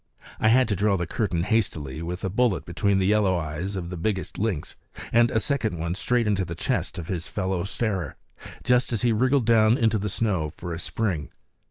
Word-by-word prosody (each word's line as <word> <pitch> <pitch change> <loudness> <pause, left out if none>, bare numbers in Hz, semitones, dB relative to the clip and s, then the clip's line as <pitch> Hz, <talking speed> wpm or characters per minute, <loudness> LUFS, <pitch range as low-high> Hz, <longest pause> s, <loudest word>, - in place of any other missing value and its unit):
I - - +3
had 125 +2 +5
to 100 - +1
draw 100 +1 +2
the 85 - -2
curtain 90 -2 -1
hastily 80 - -1
with 90 +2 -5
a - - 0
bullet 115 -1 +1
between 100 +3 +1
the 95 - +2
yellow 100 -2 +3
eyes 85 +5 -4
of 90 -2 -5
the 90 - -5
biggest 95 +2 -2
lynx, 100 -8 -2 0.4
and 120 0 +5
a 110 - +1
second 105 - -1
straight 120 +4 +1
into 100 -2 +1
the 85 -1 -5
chest - - -2
of 85 - -6
his 85 -4 -3
fellow 95 -3 -2
starer, 100 -6 -2 0.5
just 125 0 +2
as 115 -2 -1
he 120 - +4
wriggled 130 +3 +2
down 115 0 +5
into 110 -3 +2
the 105 +1 -2
snow 95 -7 0
for 85 +2 -7
a 85 - -5
spring. 90 -7 -2
100 Hz, 205 wpm, -25 LUFS, 85-110 Hz, 0.5 s, had